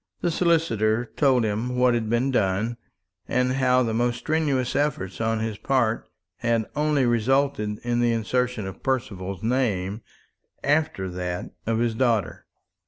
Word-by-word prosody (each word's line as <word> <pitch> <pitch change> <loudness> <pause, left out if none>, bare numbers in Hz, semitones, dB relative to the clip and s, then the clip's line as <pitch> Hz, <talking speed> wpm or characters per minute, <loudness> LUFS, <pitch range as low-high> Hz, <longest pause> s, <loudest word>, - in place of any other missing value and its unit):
The 175 - +1
solicitor 120 - +1
told 130 -5 +3
him 110 +4 -1
what 125 0 +4
had 115 -2 -1
been 120 +4 +1
done, 110 +1 0 0.5
and 125 0 +1
how 130 -1 +3
the 115 -2 -1
most 120 +1 +1
strenuous 145 -4 0
efforts 115 -10 -1
on 110 0 0
his 110 -2 -3
part 120 -4 0 0.3
had 115 -2 +1
only 150 -2 +2
resulted 120 -2 +1
in 120 0 0
the 120 -1 +3
insertion 120 0 -1
of 95 - -8
Percival's 100 -8 -3
name 110 -5 0 0.6
after 145 -9 +1
that 90 0 -4 0.2
of 115 -1 +1
his 115 0 +1
daughter. 115 -8 0
120 Hz, 145 wpm, -25 LUFS, 110-130 Hz, 0.6 s, what